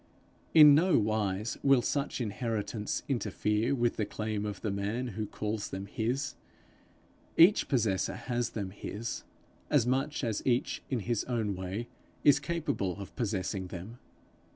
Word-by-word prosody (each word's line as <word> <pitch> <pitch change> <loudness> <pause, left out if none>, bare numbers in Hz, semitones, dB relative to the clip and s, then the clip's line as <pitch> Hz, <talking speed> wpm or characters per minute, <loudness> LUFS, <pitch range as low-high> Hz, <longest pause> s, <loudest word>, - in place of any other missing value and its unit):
In 150 -2 +10
no 175 +5 +5
wise 105 -1 0
will 135 -3 +4
such 140 +1 -1
inheritance 110 -2 -2
interfere 110 0 0
with 120 -2 +1
the 105 - 0
claim 105 -1 -3
of 100 -2 -5
the 110 - -1
man 105 +6 -2
who 105 0 -4
calls 105 0 -3
them 95 +1 -5
his. 120 +8 -2 1.0
Each 175 +5 +6
possessor 110 -8 +1
has 120 -2 -2
them 100 -5 -4
his, 105 +3 -5 0.5
as 140 -6 +4
much 135 +4 0
as 110 -4 -1
each 125 -1 0
in 125 -4 -1
his 120 +1 -1
own 110 -5 -1
way 95 +6 -4 0.4
is 145 - +6
capable 155 - -2
of 100 - -9
possessing 100 -5 -2
them. 95 +7 -8
110 Hz, 145 wpm, -30 LUFS, 100-125 Hz, 1.0 s, In